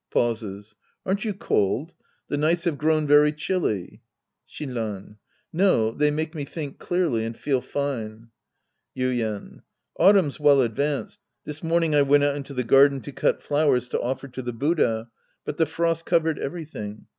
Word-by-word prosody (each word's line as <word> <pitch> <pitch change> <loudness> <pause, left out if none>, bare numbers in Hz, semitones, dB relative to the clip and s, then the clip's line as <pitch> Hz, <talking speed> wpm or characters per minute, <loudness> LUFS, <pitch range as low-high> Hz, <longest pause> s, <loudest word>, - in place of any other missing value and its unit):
{Pauses.) 110 -3 -2 0.3
Aren't 195 +4 -1
you 215 - 0
cold? 145 - 0 0.3
The - - -2
nights 160 +4 +1
have 160 -5 -1
grown 155 0 +2
very 145 +1 +5
chilly. 150 - -2 0.5
Shinran. 110 -7 -5 0.4
No. 160 - +3
They 150 +5 +1
make 155 +1 -2
me 150 -3 -4
think 145 0 -7
clearly 170 -11 0
and 115 0 -5
feel 135 -3 0
fine. 115 -5 -4 0.7
Yuien. 120 -5 -2 0.4
Autumn's 190 -8 +4
well 145 -2 +5
advanced. 140 +5 -2 0.3
This 150 0 -7
morning 165 -1 +1
I 145 - +5
went 145 +1 +4
out 145 -1 +2
into 140 -1 -7
the 125 - 0
garden 135 +3 +5
to 145 - -8
cut - - 0
flowers 145 -4 +2
to - - -1
offer 130 +2 -3
to 130 0 -7
the 120 -1 -4
Buddha, 115 -4 0 0.3
but 150 - -4
the 160 - +2
frost 165 +1 -1
covered 165 -3 +2
everything. 140 -10 -6
145 Hz, 155 wpm, -24 LUFS, 120-155 Hz, 0.7 s, very